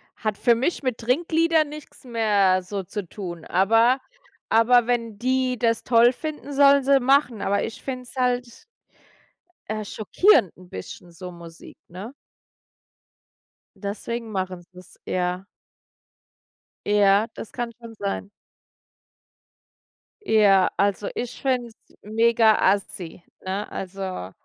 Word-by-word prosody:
hat 215 -3 -3
für 235 - +3
mich 265 +9 -1
mit 255 -3 -1
Trinkliedern 320 +5 +1
nix 300 -1 -12
mehr 205 -6 +2
so 195 +1 -5
zu 200 +1 -6
tun. 175 -4 -8
Aber 225 +7 +3 0.5
aber 235 +1 +4
wenn 230 -3 -1
die 255 +1 0
das 230 -1 +1
toll 235 0 +5
finden, 300 0 -6
sollen 280 0 +5
sie 275 +1 +4
machen. 260 -3 +2
Aber 200 +1 0
ich 225 - -7
finde 255 -2 -5
es 250 - -14
halt 250 -2 -1 1.1
äh, 215 0 -3
schockierend 220 - +2
'n 180 0 -16
bisschen, 170 - -9
so 180 +1 -9
Musik, 170 -1 -13
ne? 190 +8 -8 1.6
Deswegen 225 +3 -5
machen 185 -2 -3
sie's, 180 0 -16
ja. 180 +1 -2 1.4
Ja, 205 0 +4
das - - -9
kann 240 -2 -4
schon 230 -1 -11
sein. 200 -1 -4 2.0
Ja, 200 - +4
also 200 0 0
ich 245 0 -5
finde 255 -3 0
es 225 - -18 0.3
mega-assi, 215 -5 +1 0.2
ne? 195 +2 -4
Also, 190 - -5
220 Hz, 120 wpm, -24 LUFS, 195-250 Hz, 2.0 s, toll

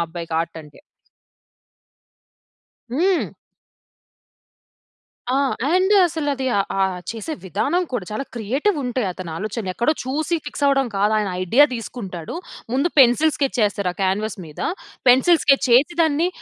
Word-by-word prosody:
అబ్బాయికి 165 -1 -6
ఆర్ట్ 165 0 -5
అంటే. 150 - -17 2.1
హ్మ్. 350 +8 +1 2.0
ఆ! 255 - +1 0.4
అండ్ 370 +3 +3
అసలది 290 -5 -2 0.3
ఆహ్, 190 -1 +1
చేసే 230 +7 -5
విధానం 340 - 0
కూడా 240 -7 -2
చాలా 215 +6 -3
క్రియేటివుంటయి 255 - -1
అతని 180 -1 -7
ఆలోచనలు. 210 +1 -4
ఎక్కడో 240 +9 +2
చూసి 310 +6 -1
ఫిక్స్ 290 - -3
అవ్వడం 275 -1 +3
కాదు, 205 +2 +2
ఆయన 210 -2 -1
ఐడియా 235 +11 +5
తీసుకుంటాడు. 200 - -6 0.4
ముందు 275 +6 +2
పెన్సిల్ 275 +5 +5
స్కెచ్చేస్తారు 210 -8 0
ఆ - - -20
క్యాన్వాస్ 195 +3 -1
మీద. 150 - -11 0.5
పెన్సిల్ 290 +7 +5
స్కెట్చేసి 275 +3 +4
దాన్ని 320 +2 +2
245 Hz, 115 wpm, -21 LUFS, 200-290 Hz, 2.1 s, ఐడియా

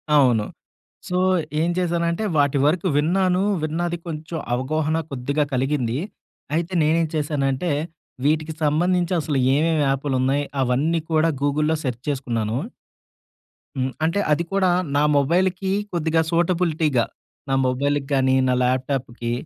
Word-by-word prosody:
అవును. 120 -7 +4 0.6
సో, 180 - -1 0.4
ఏం 170 - +1
చేశానంటే 170 +2 0
వాటి 145 -1 +3
వరకు 170 +4 +2
విన్నాను. 180 +4 +2 0.2
విన్నాది 170 +2 -1
కొంచెం 160 +1 -5 0.2
అవగాహన 155 +5 0
కొద్దిగా 140 +3 -1
కలిగింది. 130 -2 0 0.6
అయితే 170 +2 -2
నేనేం 160 +2 +2
చేశానంటే 145 +1 0 0.5
వీటికి 155 +1 +1
సంబంధించి 175 +4 +1
అసలు 150 -1 -1 0.2
ఏమేమి 155 +1 +2
యాపు‌లున్నయి 135 0 0 0.2
అవన్నీ 140 +7 +1
కూడా 160 +1 +3
గూగుల్‌‌లో 150 +2 +1
సెర్చ్ 125 -2 -4
చేసుకున్నాను. 120 -5 -2 1.2
హ్మ్. 130 0 -1
అంటే 165 +5 +1
అది 160 +3 +2
కూడా 190 -2 +3 0.3
నా 145 - +3
మొబైల్‌కి 180 +6 +1 0.2
కొద్దిగా 160 -1 +1
సూటబిలిటీ‌గా, 165 -6 +1 0.4
నా - - +1
మొబైల్‌కి 140 +2 0
గాని, 130 -1 +3
నా 125 - +2
ల్యాప్‌టాప్‌కి 130 -2 -1
150 Hz, 115 wpm, -22 LUFS, 135-170 Hz, 1.2 s, అవును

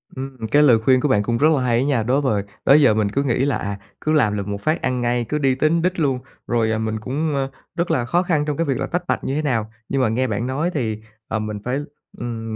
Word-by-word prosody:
Ừm, 130 -4 -6
cái 145 +1 +5
lời 120 -6 +6
khuyên 130 +3 +3
của 150 - +1
bạn 105 -7 +2
cũng 115 +2 0
rất 150 - +4
là 135 - 0
hay 120 -2 +2
á - - +1
nha. 135 -5 +1
Đối 130 +6 +1
vời 105 -8 0 0.2
đó - - +6
giờ 140 -6 +6
mình 105 -1 +1
cứ 140 +7 0
nghĩ 125 -3 0
là, 140 - +1
à, 100 -1 -4 0.2
cứ 155 - 0
làm 110 -9 +3
lược 100 - -4
một 100 0 -4
phát 155 +2 0
ăn 125 -1 -1
ngay, 120 0 0
cứ 150 - 0
đi 135 -3 +2
tính 155 +5 +2
đích 180 0 0
luôn 135 -4 +1 0.3
rồi, 115 -2 +1
à, 110 - 0
mình 110 0 -2
cũng, 145 +7 -2
a, 135 -1 0 0.3
rất 175 0 -1
là 120 - +1
khó 175 +9 +1
khăn 155 -5 +1
trong 150 -2 -2
cái 165 - +1
việc 135 -4 0
là - - -2
tách 175 +1 -2
bạch - - -1
như 135 - -2
thế 155 - 0
nào. 115 -7 -1 0.2
Nhưng 135 - +1
mà 125 - +2
nghe 125 +4 0
bạn 110 +1 -2
nói 150 +7 -1
thì, 110 -7 -2 0.3
ờ, 110 - -2
mình 105 -1 -4
phải, 125 +3 -1 0.4
ừm, 115 -2 -5
130 Hz, 290 wpm, -21 LUFS, 110-145 Hz, 0.4 s, lời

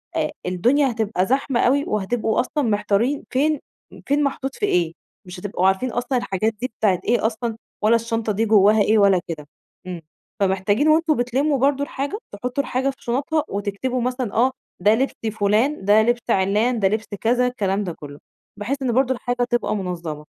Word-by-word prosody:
آآ، - - 0
الدنيا 245 +10 +2
هتبقى 220 -5 -1
زحمة 265 +1 0
أوي 280 +3 +3
وهتبقوا 215 +2 0
أصلًا 295 +3 -1
محتارين 215 +6 +1
فين 295 +2 +1 0.5
فين 290 +1 +2
محطوط 270 -1 -2
في 415 - -1
إيه، 170 - +1 0.3
مش 180 0 -9
هتبقوا 190 -1 0
عارفين 195 +7 +1
أصلًا 245 +2 -1
الحاجات 220 -1 -1
دي 255 - -2
بتاعة 195 -5 +2
إيه 240 -1 +1
أصلًا 225 0 -2 0.2
ولا 220 +2 +4
الشنطة 230 -1 -1
دي 220 +3 0
جوّاها 210 0 +5
إيه 220 +2 +3
ولا 200 -3 +5
كده. 150 -3 -6 0.4
إمم، 175 -2 -6 0.4
فمحتاجين 200 +7 +1
وأنتم 315 0 +4
بتلِمّوا 265 +5 +1
برضه 280 +2 +2
الحاجة 285 +9 -4
تحطّوا 250 +7 -3
الحاجة 265 +1 -1
في 270 - -5
شُنطها 280 +5 0
وتكتبوا 205 +6 -2
مثلًا، 250 -3 -2
آه 250 +3 +3 0.3
ده 205 +4 +4
لِبس 265 +4 0 0.3
فلان، 210 +5 +1
ده 210 +2 +6
لبس 240 +1 0
عِلّان، 210 +6 +2
ده 195 - +3
لِبس 215 +2 -1 0.2
كذا، 245 +2 +2
الكلام 205 -5 -1
ده 175 -3 -4
كلّه، 145 -1 -11 0.4
بحيث 265 +7 -3
إن 255 - 0
برضه 260 +2 +2
الحاجة 245 0 -2
تبقى 240 -3 0
منظَّمة 170 -6 -5
230 Hz, 175 wpm, -22 LUFS, 200-260 Hz, 0.5 s, ده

